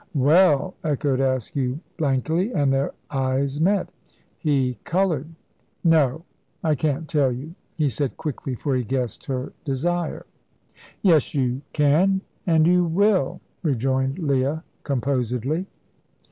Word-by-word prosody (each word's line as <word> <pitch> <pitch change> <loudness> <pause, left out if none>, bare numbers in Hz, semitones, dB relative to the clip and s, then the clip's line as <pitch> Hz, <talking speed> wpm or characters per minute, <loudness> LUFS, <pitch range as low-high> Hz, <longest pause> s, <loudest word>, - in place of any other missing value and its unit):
"Well!" 155 +4 +4
echoed 145 -3 0
Askew, 130 +1 -1 0.2
blankly, 160 - 0
and 140 -6 +2
their 135 +1 0 0.2
eyes 135 +1 0
met. 195 +3 +2 0.5
He 135 -5 +1
coloured. 170 -5 0 0.6
"No, 160 -2 +3 0.4
I 155 - +3
can't 150 +2 -1
tell 140 -3 +2
you," 135 +7 -6 0.2
he 155 -2 +1
said 135 +2 -1
quickly, 135 -3 -4
for 135 +2 -1
he 125 - 0
guessed 125 +1 -3
her 130 -1 -3
desire. 165 +5 -2 0.8
"Yes, 165 -6 +4
you 130 -1 0
can, 165 +7 +3 0.3
and 160 -2 +4
you 180 +1 +4
will," 180 +1 +2 0.2
rejoined 135 -2 0
Leah, 145 -1 0 0.2
composedly. 135 - -1
145 Hz, 120 wpm, -23 LUFS, 130-165 Hz, 0.8 s, Well